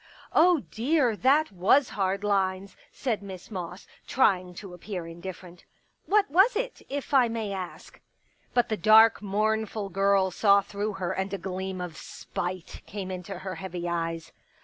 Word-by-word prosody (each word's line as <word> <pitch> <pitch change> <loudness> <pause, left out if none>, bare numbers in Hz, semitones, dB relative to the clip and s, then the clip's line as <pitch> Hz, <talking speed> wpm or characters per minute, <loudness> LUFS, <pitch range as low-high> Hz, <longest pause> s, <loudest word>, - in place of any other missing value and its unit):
" - - -23
Oh, 345 -2 +5
dear, 250 -1 +1
that 280 +6 +3
was 200 +9 +3
hard 195 0 -1
lines," 195 -1 0 0.2
said 235 -6 -2
Miss 190 0 -10
Moss 180 -1 -6 0.2
trying 185 -8 +2
to 190 -1 -9
appear 180 0 -6
indifferent. 175 +1 -9 0.2
" - - -44
What 410 0 +3
was 390 +9 +5
it - - -3
— - - -36
if 285 +1 -5
I 260 -3 +6
may 225 -3 -3
ask? 185 -2 -8 0.3
" - - -39
But 245 -1 +3
the 215 - -1
dark, 215 +4 +6
mournful 215 0 -1
girl 195 0 +2
saw 200 +2 +4
through 205 +1 -4
her 185 -2 -3
and 190 0 -2
a - - -4
gleam 190 0 -5
of 175 -3 -6
spite 180 0 -6
came 195 -2 -5
into 185 +1 -6
her 190 - -3
heavy 180 -2 -5
eyes. 165 -1 -3
195 Hz, 170 wpm, -27 LUFS, 185-225 Hz, 0.3 s, I